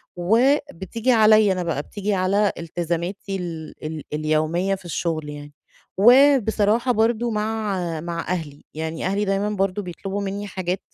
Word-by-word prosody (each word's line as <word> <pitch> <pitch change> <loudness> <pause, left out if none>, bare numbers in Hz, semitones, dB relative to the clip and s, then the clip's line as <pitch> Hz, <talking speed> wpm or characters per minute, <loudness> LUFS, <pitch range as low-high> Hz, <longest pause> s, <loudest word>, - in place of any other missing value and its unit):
وبتيجي 230 - +1
عليّا 215 -3 +5
أنا 180 - -2
بقى 160 -4 -2
بتيجي 205 +5 -3
على 200 +2 +2
التزاماتي 175 +4 -3
ال 165 -3 -6
ال 155 -1 -5
اليومية 155 +5 0
في 190 - -15
الشغل 160 -3 -2
يعني. 145 0 -9 0.4
وبصراحة 240 -1 +5
برضه 230 +1 +1
مع 215 -1 -1 0.2
مع 170 0 -4 0.2
أهلي؛ 145 -1 -14
يعني 160 +1 -4
أهلي 200 +2 0
دايمًا 195 +1 0
برضه 195 -1 -1
بيطلبوا 195 +2 -5
مني 200 +1 -4
حاجات 185 -1 -3
195 Hz, 135 wpm, -22 LUFS, 170-215 Hz, 0.4 s, عليّا